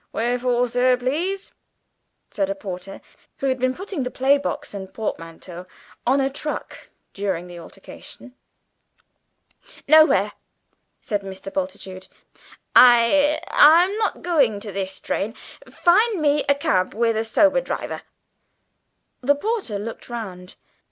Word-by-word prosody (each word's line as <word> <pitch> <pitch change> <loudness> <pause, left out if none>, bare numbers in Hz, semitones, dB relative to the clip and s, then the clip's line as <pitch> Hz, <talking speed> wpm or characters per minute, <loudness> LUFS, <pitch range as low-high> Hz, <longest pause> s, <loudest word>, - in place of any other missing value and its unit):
"Where 240 +2 -1
for, 245 0 +1
sir, 250 +1 +2
please?" 335 +10 -2 0.8
said 295 -1 -1
a 295 - -2
porter, 195 -7 -8 0.4
who - - -4
had 260 0 -1
been 255 +1 0
putting 385 -4 -5
the 250 - -2
playbox 280 +2 0
and 190 -2 -7
portmanteau 175 -3 -7 0.4
on 270 +3 +3
a 270 - +2
truck 290 +2 -6 0.2
during 190 -4 -3
the 175 -1 -10
altercation. 250 +8 -12 1.5
"Nowhere," 310 +2 +5 0.7
said 205 -2 -2
Mr. 195 0 -8
Bultitude. 185 0 -5 0.7
"I 255 +5 +6
I'm 345 +6 +6
not 435 - -2
going 280 -12 +2
by 205 0 -8
this 190 0 -4
train; 220 +4 -3 0.3
find 410 +4 +3
me 295 -1 +2
a 280 - +5
cab 185 -10 0
with 230 0 +1
a 220 - 0
sober 295 - +3
driver." - - -5 1.2
The 285 +3 +3
porter 395 - -3
looked 225 +4 -8
round. 190 -6 -7
245 Hz, 125 wpm, -22 LUFS, 200-295 Hz, 1.5 s, I